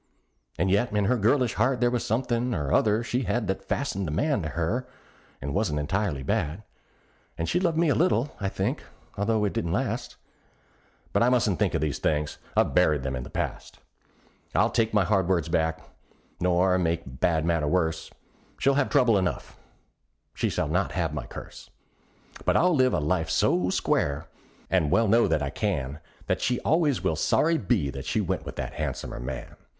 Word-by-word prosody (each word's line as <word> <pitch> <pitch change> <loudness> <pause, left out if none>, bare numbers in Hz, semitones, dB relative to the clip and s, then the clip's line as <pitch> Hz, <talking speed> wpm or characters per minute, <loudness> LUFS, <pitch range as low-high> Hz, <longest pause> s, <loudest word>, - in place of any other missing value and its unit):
And 95 +2 +1
yet 100 +5 +2
in 105 -1 +1
her 125 - +3
girlish 120 +2 +2
heart 130 -2 +1
there 120 0 +2
was 120 -1 -1
somethin' 120 +1 0
or 75 -3 -1
other 110 +2 +3
she 120 +2 -1
had 120 -2 0
That 95 0 -2
fastened 100 -9 -2
a - - -3
man 140 - +1
to 75 - -3
her, 100 - -2 0.5
and 70 +1 -4
wasn't 100 -7 0
entirely 80 -1 -1
bad; 75 +8 -1 0.7
And 85 - -2
she 175 - +1
loved 170 -3 0
me 170 0 +3
a - - +4
little, 150 -6 +1
I 100 - -1
think, - - -2 0.3
although 105 +1 +1
it 100 - -1
didn't 85 0 -1
last; - - -2 1.0
But - - +2
I 120 - +5
mustn't 115 -7 +2
think - - +1
of - - 0
these 75 -2 -1
things 75 0 -1 0.2
I've - - +3
buried 75 -3 +3
'em 65 -1 -2
in 65 - -4
the - - -8
past. - - -4 0.8
I'll - - +3
take 115 -1 +1
my 105 -2 +3
hard 95 -2 +1
words 85 -4 +1
back, 80 -1 0 0.5
nor 90 +1 +3
make 85 -1 0
a - - -9
bad 80 +5 0
matter 85 -3 +1
worse; 80 -1 0 0.5
She'll 140 +1 +3
have 140 0 +1
trouble 125 -8 +4
enough; 90 -1 -3 0.8
she - - -1
shall - - -1
not 90 +6 0
have 85 -5 -1
my 75 -5 -5
curse; - - -10 0.7
But - - +3
I'll 180 +1 +4
live 130 -4 +3
a - - +1
life 80 +2 0
so 90 0 +2
square 70 -4 0 0.4
and 90 -4 +2
I - - -1
well 115 +8 +3
know 115 +3 +4
that 80 -2 +1
I 70 - -3
can 70 +3 -2 0.3
That - - -1
she 125 - +1
always 155 -5 +2
will 80 - +1
sorry 160 - +2
be 90 - 0
that 70 -1 -7
she - - 0
went - - -2
with - - -6
that - - -4
han'somer - - -4
man. 65 +1 -6
95 Hz, 195 wpm, -26 LUFS, 80-120 Hz, 1.0 s, I